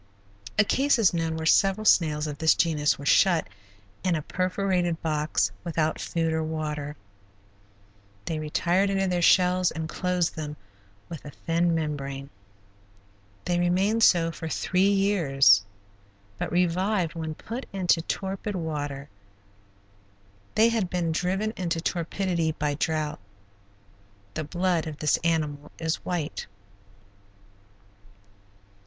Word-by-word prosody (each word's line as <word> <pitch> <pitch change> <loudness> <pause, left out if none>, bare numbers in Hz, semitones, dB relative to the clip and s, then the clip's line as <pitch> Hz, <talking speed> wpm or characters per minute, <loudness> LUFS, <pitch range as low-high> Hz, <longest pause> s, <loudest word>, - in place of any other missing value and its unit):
A 210 - +6
case 275 +6 +2
is 215 -6 +3
known 165 -1 -1
where 160 - -4
several 195 +5 +3
snails 155 -6 +3
of 150 -1 -5
this 160 0 +4
genus 150 -3 +1
were 140 - -9
shut 175 +3 +4 0.6
in 180 -2 +2
a 155 - -3
perforated 185 -2 -1
box 155 -1 0
without 160 -2 -1
food 165 -1 -1
or 160 - 0
water. 150 -2 -4 1.3
They 160 -2 -2
retired 175 +5 +1
into 195 -1 +1
their 180 -1 0
shells 180 +1 +4
and 160 -1 -4
closed 180 +1 -1
them 150 -1 -5 0.5
with 165 -4 -8
a 150 - -8
thin 170 +3 0
membrane. 140 -3 -4 1.1
They 175 -1 +1
remained 190 +6 +2
so 170 -6 +5
for 160 0 -6
three 190 +4 +1
years, 150 - +4 0.8
but - - -3
revived 180 +1 +1
when 160 -2 -5
put 235 - -7
into 180 -3 +2
torpid 195 +4 -4
water. 145 -4 -4 1.5
They 225 +2 +5
had 220 -6 0
been 175 -2 -1
driven 190 +6 -1
into 170 -2 -2
torpidity 170 -1 -1
by 150 -1 -1
drought. 155 -1 -2 1.1
The 155 - -3
blood 175 0 0
of 155 -2 -6
this 150 -1 +2
animal 150 -3 -1
is 160 -1 -1
white. 170 -4 -4
165 Hz, 125 wpm, -26 LUFS, 155-185 Hz, 1.5 s, A